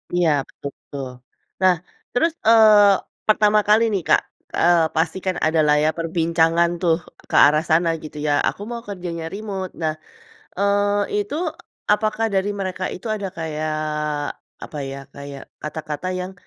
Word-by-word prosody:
Iya 175 -2 +3 0.2
betul 140 - -8
betul. 140 -2 -7 0.5
Nah 185 -1 +5 0.4
terus, 330 +7 +2 0.2
eee, 215 -3 +7 0.3
pertama 215 0 +4
kali 215 +2 +5
nih 195 - 0
Kak, - - +5 0.3
eee, 170 -1 +4
pasti 160 +2 0
kan 185 -1 0
adalah 155 -2 +3
ya 155 - +3
perbincangan 165 0 +2
tuh 170 -3 +3 0.3
ke - - -2
arah 150 +2 +3
sana 165 +1 +4
gitu 155 -1 -9
ya, - - +2 0.2
aku - - -9
mau 235 -1 -4
kerjanya 175 -4 -5
remote. 195 -3 -5
Nah, 155 -1 0 0.7
eee, 205 +1 +1
itu, 205 +6 -4 0.6
apakah 215 +1 +1
dari 190 +1 +1
mereka 185 -1 -3
itu 185 - -10
ada 200 -2 -4
kayak 155 -1 -3 0.9
apa 150 - -8
ya, 135 - -6 0.2
kayak 140 -1 -8 0.2
kata-kata 150 +1 -5
yang, 180 +1 -5
180 Hz, 145 wpm, -21 LUFS, 160-205 Hz, 0.9 s, eee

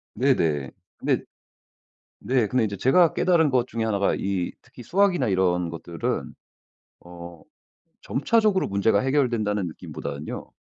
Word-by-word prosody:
네네. 85 - +1 0.3
근데 - - 0 1.0
네. 120 +1 +1
근데 125 +2 +1
이제 100 -2 -3
제가 160 - +4
깨달은 165 -5 +3
것 125 -2 +2
중의 115 -2 -3
하나가 100 -3 +1
이 95 -3 -2
특히 125 0 -14
수학이나 175 - +2
이런 90 -2 +1
것들은 85 0 -4 0.7
어 85 -1 -11 0.6
점차적으로 210 +6 +1
문제가 100 +1 +2
해결된다는 115 -7 0
느낌보다는요 75 -2 -7
110 Hz, 295 characters per minute, -24 LUFS, 90-135 Hz, 1.0 s, 제가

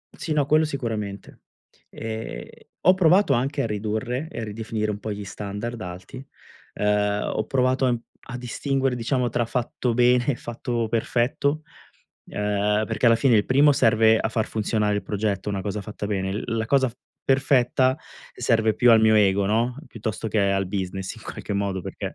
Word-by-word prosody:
Sì, 160 - -6
no, 145 -2 +2
quello 155 +2 +4
sicuramente. 110 -8 -5 0.5
E 110 - -7
ho 185 - +6
provato 185 -2 +4
anche 135 +3 0
a - - 0
ridurre 110 +6 -3
e 115 - -6
a - - -3
ridefinire 110 0 -3
un 105 - -5
po' 110 - -5
gli 105 0 -5
standard 105 +5 -5
alti. 90 +8 -8 0.5
Uhm, 105 0 +1
ho 110 - -1
provato, 130 0 +2
ehm, 120 -1 +1 0.3
a 125 -1 -5
distinguere, 135 +1 -1
diciamo, 125 +1 0
tra 120 0 0
fatto 120 0 -2
bene 125 0 +4
e 145 - +2
fatto 120 -1 -3
perfetto, 125 +6 0 0.6
ehm, 105 +1 0
perché 115 +2 0
alla 115 - +7
fine 120 0 +4
il 105 - +2
primo 140 +3 +5
serve 110 -3 +4
a - - -1
far 110 -1 -1
funzionare 105 -1 0
il 105 - -2
progetto, 105 -1 -2
una 100 -2 -2
cosa 105 0 -3
fatta 105 0 -6
bene. 95 -2 -2
L 105 - -3
la 110 - -1
cosa 130 -1 +2 0.3
perfetta 130 -1 +3 0.4
serve 110 -3 +2
più 120 -1 +4
al 115 - +7
mio 110 0 +5
ego, 100 -2 +3
no, 115 +4 +1
piuttosto 110 -3 -5
che 110 -1 +1
al 95 0 0
business 95 0 -4
in - - -14
qualche - - -6
modo, 100 -1 -1
perché - - -6
110 Hz, 175 wpm, -24 LUFS, 105-125 Hz, 0.6 s, alla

